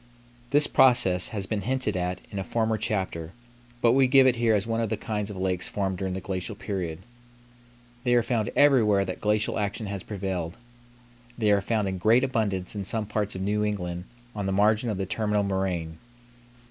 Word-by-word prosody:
This 145 +2 +5
process 120 -11 +4
has 100 -4 -4
been 105 0 -2
hinted 130 -3 0
at 90 0 -2
in 100 - -4
a - - -2
former 110 +3 0
chapter, 95 -6 -2 0.5
but 115 - +6
we 130 +1 +4
give 135 +1 +6
it 125 -2 +3
here 115 -2 +3
as 100 - 0
one 115 0 -1
of 115 - -1
the - - -1
kinds 105 -2 -3
of 100 - -7
lakes 95 -1 -1
formed 95 -3 -2
during 95 -1 -2
the - - -3
glacial 95 +2 -4
period. 95 -5 -4 1.0
They 120 0 +3
are 120 - +4
found 115 -3 -1
everywhere 110 -9 +4
that 90 - -6
glacial 105 +1 +1
action 105 +1 -2
has 100 -1 -4
prevailed. 95 -4 -4 0.8
They 110 -3 +2
are 100 -1 +3
found 105 0 0
in 95 -1 -3
great 115 +7 +4
abundance 105 -8 -1
in 100 - -3
some 110 +2 -1
parts 105 -1 -2
of 95 - -4
New 105 +1 0
England 90 -4 -3 0.3
on 100 -2 -3
the - - 0
margin 105 +4 +2
of 105 - -2
the 95 - -2
terminal 105 +1 0
moraine. 90 -5 -2
105 Hz, 200 wpm, -26 LUFS, 95-110 Hz, 1.0 s, but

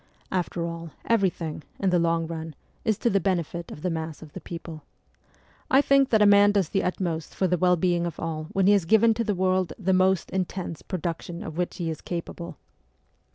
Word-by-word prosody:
After 175 -2 -1
all, 170 0 -5 0.2
everything, 180 -8 0 0.2
in 190 -2 +1
the 175 - +3
long 165 0 +1
run, 160 -1 -6 0.3
is 215 -3 +1
to 240 - +1
the 195 - +3
benefit 170 -2 -2
of 150 - -10
the 180 - 0
mass 160 -1 -5
of 150 - -14
the - - -7
people. 165 -2 -8 0.9
I 265 - +6
think 275 -1 +4
that 220 -2 +4
a - - +6
man 205 0 +6
does 195 -6 +1
the 195 - +1
utmost 170 -3 -2
for 190 - +1
the 180 0 +2
well 180 +1 +3
being 175 0 +1
of 165 - -7
all 160 -1 -3
when 190 +4 0
he 205 - +6
has 200 -5 +2
given 220 +5 +5
to 230 +1 -1
the 210 -3 -1
world 185 0 +1
the 190 -2 +1
most 185 -1 +2
intense 185 -3 -3
production 170 -1 -4
of 160 - -7
which 180 +1 -2
he 165 -2 -2
is 155 - -7
capable. 170 -2 -6
180 Hz, 210 wpm, -26 LUFS, 165-195 Hz, 0.9 s, I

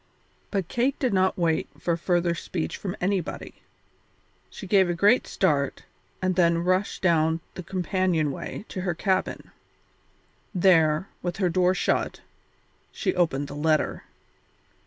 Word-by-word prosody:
But 195 -5 -2
Kate 255 +6 0
did 255 -6 0
not 190 0 +2
wait 165 -3 0
for 170 - 0
further 175 0 +1
speech 170 0 -4
from 190 -3 -5
anybody. 190 -2 -3 0.9
She - - -9
gave 190 -1 +4
a 175 - 0
great 205 +8 +4
start, 145 -7 0 0.4
and 185 -1 +1
then 170 -1 +3
rushed 185 +3 0
down 160 -2 +3
the - - -6
companion 180 -3 0
way 205 - -6
to 185 - -4
her 180 -3 -1
cabin. 190 +1 -1 1.0
There, 170 -2 +4
with 175 +1 -3
her 190 -3 +1
door 180 +2 +2
shut, - - -1 0.7
she - - -1
opened 160 -6 0
the 145 - -8
letter. 155 +1 0
180 Hz, 135 wpm, -26 LUFS, 165-190 Hz, 1.0 s, gave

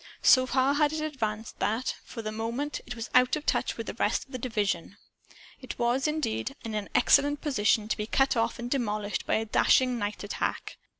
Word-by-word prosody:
So 255 -1 +6
far 260 +2 +2
had 295 +1 +2
it 315 - -2
advanced 225 -8 -4
that, 225 +4 0
for 230 - -8
the 215 - -3
moment, 235 +7 -3
it 245 - -5
was 230 -1 -6
out 250 +2 +5
of 305 0 -6
touch - - 0
with - - -4
the - - -5
rest - - 0
of 270 - -24
the 255 - -5
division. 205 -6 -2 0.6
It 255 - -7
was, 245 +4 +1
indeed, 275 -3 -2
in 225 - -4
an 210 -1 -3
excellent 290 +1 +4
position 215 -7 +1
to - - -1
be 210 -1 -3
cut 270 +3 +2
off 230 +2 0
and 240 0 -5
demolished 215 -6 -2
by - - +2
a 220 - 0
dashing 250 +3 +3
nightattack. 205 -1 -3
240 Hz, 200 wpm, -28 LUFS, 215-270 Hz, 0.6 s, So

